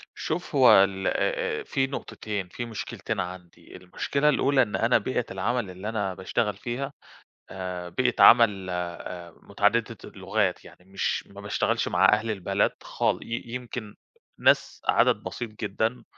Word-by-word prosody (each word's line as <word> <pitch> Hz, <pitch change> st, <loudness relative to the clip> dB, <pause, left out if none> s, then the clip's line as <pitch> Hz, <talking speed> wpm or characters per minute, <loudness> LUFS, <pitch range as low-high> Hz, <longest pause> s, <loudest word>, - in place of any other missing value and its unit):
شوف 160 Hz, 0 st, -4 dB
هو 130 Hz, -3 st, +7 dB
ال 95 Hz, -1 st, -2 dB
آآ، -, -, 0 dB
آآ -, -, -6 dB
في 135 Hz, -, 0 dB
نقطتين، 105 Hz, -7 st, -5 dB
في 120 Hz, +7 st, -6 dB
مشكلتين 115 Hz, -2 st, -5 dB
عندي، 90 Hz, -1 st, -8 dB
المشكلة 140 Hz, +11 st, 0 dB
الأولى 140 Hz, -1 st, +3 dB
إن 110 Hz, -5 st, 0 dB
أنا 115 Hz, +2 st, +3 dB
بيئة 125 Hz, +2 st, -2 dB
العمل 105 Hz, +3 st, -1 dB
اللي 95 Hz, +4 st, -6 dB
أنا 105 Hz, -4 st, -2 dB
باشتغل 100 Hz, +2 st, -2 dB
فيها 130 Hz, +6 st, -4 dB, 0.6 s
آآ، 90 Hz, -1 st, -5 dB
بيئة 125 Hz, +7 st, +1 dB
عمل 105 Hz, -5 st, +7 dB
آآ، 90 Hz, 0 st, -5 dB
متعددة -, -, +1 dB
اللغات. -, -, -1 dB
يعني 90 Hz, -, -16 dB
مش 95 Hz, +1 st, -2 dB
ما -, -, -12 dB
باشتغلش -, -, 0 dB
مع -, -, +2 dB
أهل 110 Hz, +2 st, +1 dB
البلد 100 Hz, -1 st, 0 dB
خال -, -, 0 dB
ي 115 Hz, +1 st, -4 dB
يمكن 120 Hz, -4 st, -6 dB, 0.4 s
ناس -, -, +2 dB
عدد -, -, +4 dB
بسيط 120 Hz, -2 st, -5 dB
جدًا، 110 Hz, +3 st, -2 dB
110 Hz, 150 wpm, -26 LUFS, 95-125 Hz, 0.6 s, هو